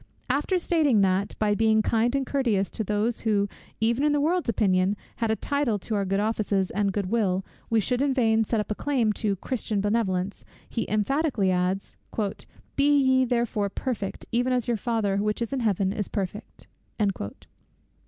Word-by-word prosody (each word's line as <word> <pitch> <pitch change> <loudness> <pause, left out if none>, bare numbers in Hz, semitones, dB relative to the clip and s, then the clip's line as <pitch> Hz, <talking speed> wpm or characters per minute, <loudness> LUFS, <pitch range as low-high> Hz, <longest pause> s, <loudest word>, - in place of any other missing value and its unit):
After 295 +8 +1
stating 310 - +3
that, 190 +1 +1
by 210 -1 +2
being 220 0 +3
kind 235 +4 +1
and 275 -1 0
courteous 230 -9 0
to 220 - -3
those 210 +3 0
who, 205 -3 +1 0.3
even 235 +5 +1
in 300 0 +3
the 295 - +2
world's 330 0 +1
opinion, 195 -2 +2 0.2
had 230 -1 0
a 220 - +2
title 280 -4 0
to 210 +3 -5
our 200 -2 +1
good 195 +1 0
offices 205 -3 0
and 200 0 +1
good 195 -1 -2
will, 195 -5 +1 0.2
we 225 - +3
should 250 +4 0
in 280 0 +2
vain 225 -4 +3
set 225 +1 0
up 210 - -3
a - - +3
claim 240 -3 +1
to 205 -2 0
Christian 215 +1 -2
benevolence, 200 -2 0 0.2
he 230 - -3
emphatically 215 -1 +1
adds, 185 +2 -1 0.8
"Be 290 +1 +4
ye 260 -1 +4
therefore 235 -4 0
perfect, 210 -2 -4
even 245 +2 +1
as 250 -1 0
your 240 - +2
Father 220 -3 0
which 210 +1 0
is 235 +2 -3
in 270 - 0
heaven 200 -4 +1
is 205 -2 -2
perfect." 200 +2 -5
220 Hz, 180 wpm, -26 LUFS, 200-250 Hz, 0.8 s, Be